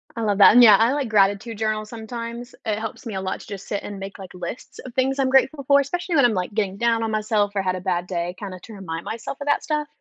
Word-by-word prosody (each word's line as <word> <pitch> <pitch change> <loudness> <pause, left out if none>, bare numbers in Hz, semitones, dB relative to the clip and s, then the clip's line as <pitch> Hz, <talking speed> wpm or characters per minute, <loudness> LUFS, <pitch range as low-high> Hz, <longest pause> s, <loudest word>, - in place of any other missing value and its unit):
I 230 - -4
love 205 -2 +1
that, 200 - +9
and 245 - +8
yeah, 210 -4 +9
I 230 +5 +3
like 280 -4 -2
gratitude 205 +2 +2
journals 215 -1 -2
sometimes, 235 +1 -7
it 215 -1 -1
helps 225 +4 -7
me 220 - -5
a 190 - -2
lot 190 0 -3
to - - -14
just 195 -2 -8
sit 205 - -3
and 205 -1 -7
make, 195 +1 -7
like, 190 -2 -10
lists 180 +6 -8
of 255 - -9
things 265 +2 0
I'm 265 - +2
grateful 270 +2 +3
for, 280 0 +6
especially 345 +5 -2
when 280 -4 +5
I'm, 235 - +3
like, 185 +2 -3
getting 200 -3 -1
down 230 0 +1
on 225 - -2
myself, 215 -1 +1
or 195 - +1
had 185 -1 -1
a 185 - -6
bad 175 -1 -1
day, 175 0 -3
kinda 190 -3 -7
to 225 - -12
remind 170 -5 -6
myself 230 +4 -6
of 285 - -5
that 290 - +2
stuff. 300 -1 -1
215 Hz, 280 wpm, -23 LUFS, 195-245 Hz, -, that